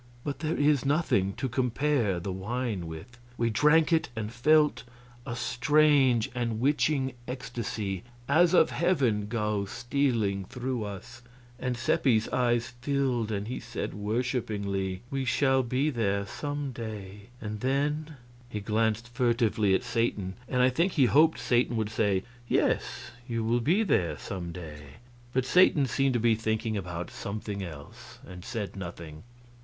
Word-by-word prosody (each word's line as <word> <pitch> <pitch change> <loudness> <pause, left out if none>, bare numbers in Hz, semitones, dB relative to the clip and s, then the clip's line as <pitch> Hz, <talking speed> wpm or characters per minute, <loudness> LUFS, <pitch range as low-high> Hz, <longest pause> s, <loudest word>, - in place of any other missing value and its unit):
But 140 -2 -4
there 155 +1 -1
is 145 -2 +3
nothing 135 - +1
to 130 - -3
compare 125 -5 +1
the 95 +3 -4
wine 100 -1 -3
with. 80 +10 -9 0.2
We 115 -1 +1
drank 150 +8 +4
it, 160 - +2
and 110 0 -4
felt 150 +5 +3 0.5
a 120 - -3
strange 135 -2 +3
and 120 -3 -2
witching 135 0 +1
ecstasy 115 -7 -4 0.2
as 175 +5 +4
of - - +5
heaven 130 - +1
go 105 -2 -1
stealing 115 -5 0
through 125 0 -3
us, 105 +4 -8 0.4
and 125 -2 -2
Seppi's 115 -2 +2
eyes 120 -1 +1
filled 130 -5 0
and 100 0 -2
he 125 - -4
said - - -5
worshipingly: 105 -4 -2
"We 135 -1 -1
shall 130 +2 +3
be 130 +5 0
there 100 -5 0
some 145 +5 -4
day, 105 -3 -8
and 105 -1 -5
then 145 +5 -1 0.2
" 120 0 -24
He 105 - -4
glanced 110 +2 0
furtively 115 -5 +2
at - - -1
Satan, 115 -6 -1 0.2
and 125 -1 +2
I 130 - +5
think 170 +8 +1
he 140 -6 +4
hoped 155 +6 +5
Satan 120 -1 +1
would 110 -1 -1
say, 100 -3 +1 0.2
"Yes, - - 0 0.2
you 115 -2 -2
will 120 +2 +1
be 175 - +3
there 85 - +1
some 90 -3 -5
day," 75 -5 -9 0.4
but 130 0 0
Satan 155 -2 +5
seemed 135 +1 +1
to - - +2
be 115 0 +4
thinking 110 0 -1
about 90 -3 -4
something 100 0 -5
else, 110 - -10
and 90 -1 -10
said 110 -6 -4
nothing. 85 -4 -8
120 Hz, 150 wpm, -28 LUFS, 105-135 Hz, 0.5 s, of